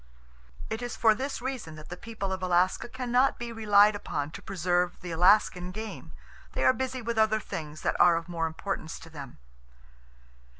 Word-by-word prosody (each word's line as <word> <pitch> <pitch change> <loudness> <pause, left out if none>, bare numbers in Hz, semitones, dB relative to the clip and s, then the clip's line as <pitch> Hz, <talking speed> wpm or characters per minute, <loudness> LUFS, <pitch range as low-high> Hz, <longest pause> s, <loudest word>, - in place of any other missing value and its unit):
It 220 +2 -2
is 245 0 -4
for 225 -2 +5
this 260 +2 -4
reason 255 -12 -4
that 155 0 -11
the 175 - -5
people 200 -1 -5
of 190 - -4
Alaska 185 +5 +1
can 250 -1 -5
not 255 +2 +4
be 240 -1 -5
relied 210 -2 +5
upon 145 -7 -3
to - - -9
preserve 180 -1 0
the 180 -2 -6
Alaskan 180 +1 +4
game. 215 +3 -7 0.4
They - - -1
are - - +6
busy 260 -1 -3
with 230 -1 -1
other 220 0 +3
things 155 -6 -7
that - - 0
are 175 -1 +7
of 165 +1 -3
more 165 -2 -1
importance 160 0 -4
to 165 - -13
them. 140 -5 -9
195 Hz, 185 wpm, -28 LUFS, 170-230 Hz, 0.4 s, are